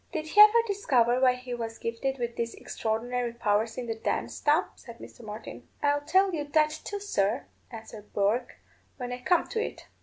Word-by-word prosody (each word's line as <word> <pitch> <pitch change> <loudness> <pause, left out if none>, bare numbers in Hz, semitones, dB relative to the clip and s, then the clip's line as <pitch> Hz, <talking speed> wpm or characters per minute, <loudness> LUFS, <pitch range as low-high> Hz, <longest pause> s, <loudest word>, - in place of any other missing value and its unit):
"Did 315 -2 -2
he 415 +7 +6
ever 435 +2 +8
discover 255 - +2
why 255 -1 +5
he 250 0 -7
was 225 -1 -5
gifted 250 +4 -3
with 235 -1 -3
these 235 0 -3
extraordinary 235 +2 -2
powers 220 -1 0
in 250 - -3
the 230 - -2
dance, 220 - -3
Tom?" 300 +3 +3
said 235 -2 -13
Mr. - - -12
Martin. 215 0 -9 0.2
"I'll 290 0 +2
tell 380 +5 +3
you 305 -3 -1
that 305 +1 +3
too, 410 - -4
sir," 230 - 0 0.2
answered 220 -2 -11
Bourke, 215 +5 0 0.4
"when 250 -2 -5
I 250 0 -5
come 350 +6 +2
to 450 -1 -1
it. - - -7
245 Hz, 190 wpm, -28 LUFS, 230-305 Hz, 0.4 s, ever